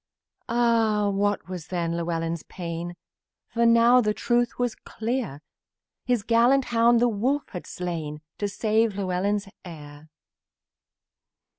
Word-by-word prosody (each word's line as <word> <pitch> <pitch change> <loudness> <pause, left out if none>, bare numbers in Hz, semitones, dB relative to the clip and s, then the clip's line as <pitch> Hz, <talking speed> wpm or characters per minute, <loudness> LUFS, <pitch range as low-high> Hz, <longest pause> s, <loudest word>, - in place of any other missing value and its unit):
Ah! 225 -3 +2
What 205 0 0
was 180 -4 -7
then 170 -2 -2
Llewellyn's 165 -1 -2
pain! 170 0 -6 0.5
For 235 0 +2
now 235 +2 +6
the 210 -2 0
truth 240 0 0
was 245 -2 0
clear: 225 - -4 0.6
The 250 -1 +3
gallant 245 +3 +4
hound 230 +1 +5
the 245 - +4
wolf 250 +7 -1
had 180 - -7
slain 160 -4 -5 0.2
To 205 - 0
save 220 +1 +1
Llewellyn's 200 +1 -1 0.2
heir. 150 -3 -11
205 Hz, 120 wpm, -25 LUFS, 175-235 Hz, 0.6 s, now